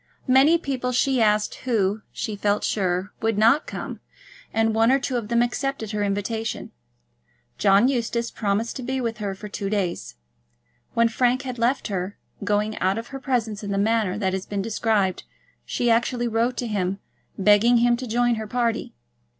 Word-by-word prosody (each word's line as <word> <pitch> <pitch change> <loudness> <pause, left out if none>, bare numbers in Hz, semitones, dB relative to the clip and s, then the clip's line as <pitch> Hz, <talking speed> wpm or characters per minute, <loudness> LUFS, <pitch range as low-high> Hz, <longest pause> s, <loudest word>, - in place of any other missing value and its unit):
Many 270 +6 +6
people 260 -5 -2
she 255 0 +2
asked 210 -1 +2
who, 215 -4 +1
she 215 -3 -4
felt 205 +1 0
sure, 185 -1 -1
would 225 -2 0
not 230 +8 +4
come, - - -6 0.5
and 225 0 +1
one 225 +2 +4
or 270 - +5
two 265 -1 -3
of 235 -3 -2
them 235 +1 +3
accepted 245 -2 -2
her 210 -1 -2
invitation. 205 +3 -2 0.9
John 200 +5 +5
Eustace 235 -2 -1
promised 210 +2 -1
to - - -5
be 260 +2 -2
with 230 -3 -3
her 200 -2 -3
for 210 +2 -8
two 200 -1 -4
days. 195 -4 -2 0.8
When 230 0 +4
Frank 250 +3 +1
had 255 -3 -5
left 240 +1 +1
her, 190 0 -3 0.3
going 210 +1 0
out 190 +3 +1
of 230 +1 -6
her 270 - -6
presence 235 -6 -1
in 205 - -4
the 200 - -1
manner 210 -2 +1
that 190 -3 0
has 190 0 -3
been 200 -1 -2
described, 215 -3 0 0.5
she 240 -1 +1
actually 240 +1 +1
wrote 235 +2 0
to 245 - -2
him, 195 -3 -1 0.4
begging 210 +4 +5
him 240 +1 +4
to 255 +1 -6
join 240 +1 +2
her 215 - -5
party. 235 0 -1
225 Hz, 180 wpm, -24 LUFS, 205-245 Hz, 0.9 s, Many